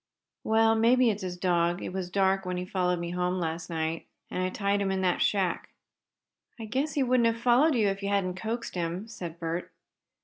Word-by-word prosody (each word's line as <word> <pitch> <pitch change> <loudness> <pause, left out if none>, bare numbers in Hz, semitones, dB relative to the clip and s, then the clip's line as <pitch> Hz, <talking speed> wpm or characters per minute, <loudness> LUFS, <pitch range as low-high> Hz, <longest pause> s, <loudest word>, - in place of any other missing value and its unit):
"Well, 225 0 +4
maybe 235 +2 +4
it 200 - -3
is - - -11
his 180 -1 -4
dog. 175 -1 +1
It - - -5
was 185 -2 -3
dark 195 +1 +2
when 180 -1 -3
he 180 - -3
followed 180 -1 0
me 170 0 -4
home 180 +1 -1
last 165 -1 -3
night, 160 0 -3 0.2
and 185 - -2
I 185 - 0
tied 200 +1 0
him 195 - 0
in 190 0 0
that 180 -1 +1
shack." 190 -4 0 0.9
"I 225 - -5
guess 265 +8 -1
he 285 - +2
wouldn't 250 -2 +3
have 230 0 0
followed 250 +6 +4
you 220 -4 +3
if 195 +1 -3
you 200 - -2
hadn't 195 -2 +1
coaxed 225 +5 -4
him," 175 +4 -3
said 175 -7 -7
Bert. 170 +1 -4
190 Hz, 215 wpm, -28 LUFS, 180-225 Hz, 0.9 s, Well